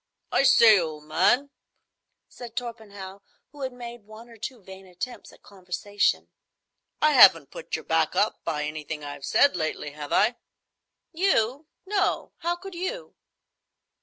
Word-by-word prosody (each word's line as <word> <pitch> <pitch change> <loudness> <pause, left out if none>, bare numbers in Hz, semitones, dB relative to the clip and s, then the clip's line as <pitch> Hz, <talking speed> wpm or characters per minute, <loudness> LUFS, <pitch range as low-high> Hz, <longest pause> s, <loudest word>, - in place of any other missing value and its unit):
"I - - +3
say, 225 -6 +7
old 155 -3 -5
man," 190 - +2 0.8
said 235 -2 -11
Torpenhow, 205 -5 -7 0.3
who 290 - -13
had 260 -1 -3
made 240 -1 -9
one 220 +2 -13
or 230 - -14
two 230 0 -7
vain 190 0 -12
attempts 185 +8 -7
at - - -21
conversation, 200 +1 -2 0.7
"I 305 - +6
haven't - - +7
put - - -5
your - - -7
back - - +1
up - - 0
by 150 -3 -2
anything 150 0 -5
I've 145 -1 -7
said 285 - +4
lately, 155 -3 -3
have 145 0 -8
I?" 230 +4 +3 0.7
"You! 300 - +1 0.2
No. 395 0 -1
How 345 +1 -1
could 380 +2 -10
you?" 375 +9 -5
220 Hz, 145 wpm, -26 LUFS, 180-275 Hz, 0.8 s, say